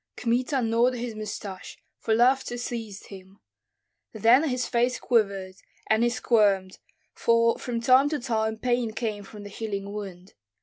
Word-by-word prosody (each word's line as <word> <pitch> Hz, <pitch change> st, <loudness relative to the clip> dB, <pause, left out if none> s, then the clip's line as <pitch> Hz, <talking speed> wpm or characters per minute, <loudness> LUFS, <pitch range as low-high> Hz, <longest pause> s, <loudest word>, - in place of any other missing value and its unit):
Kmita 250 Hz, +2 st, 0 dB
gnawed 230 Hz, +3 st, +2 dB
his 240 Hz, -1 st, -4 dB
mustache, 210 Hz, -3 st, -7 dB, 0.2 s
for 220 Hz, -, +1 dB
laughter 245 Hz, +1 st, +2 dB
seized 225 Hz, -4 st, -6 dB
him; 190 Hz, 0 st, -13 dB, 0.7 s
then 230 Hz, +7 st, +4 dB
his 250 Hz, -1 st, -1 dB
face 245 Hz, +1 st, 0 dB
quivered, 195 Hz, -5 st, 0 dB, 0.3 s
and 220 Hz, +1 st, +3 dB
he 240 Hz, -, +3 dB
squirmed, 205 Hz, -6 st, +1 dB, 0.3 s
for 230 Hz, 0 st, +2 dB
from 240 Hz, -2 st, -3 dB
time 255 Hz, +4 st, +4 dB
to 305 Hz, -, -1 dB
time 220 Hz, -3 st, -1 dB
pain 240 Hz, -1 st, -1 dB
came 215 Hz, -3 st, -3 dB
from 205 Hz, +1 st, -11 dB
the 205 Hz, -, -9 dB
healing 200 Hz, -1 st, -5 dB
wound. 190 Hz, -3 st, -8 dB
225 Hz, 145 wpm, -26 LUFS, 205-245 Hz, 0.7 s, then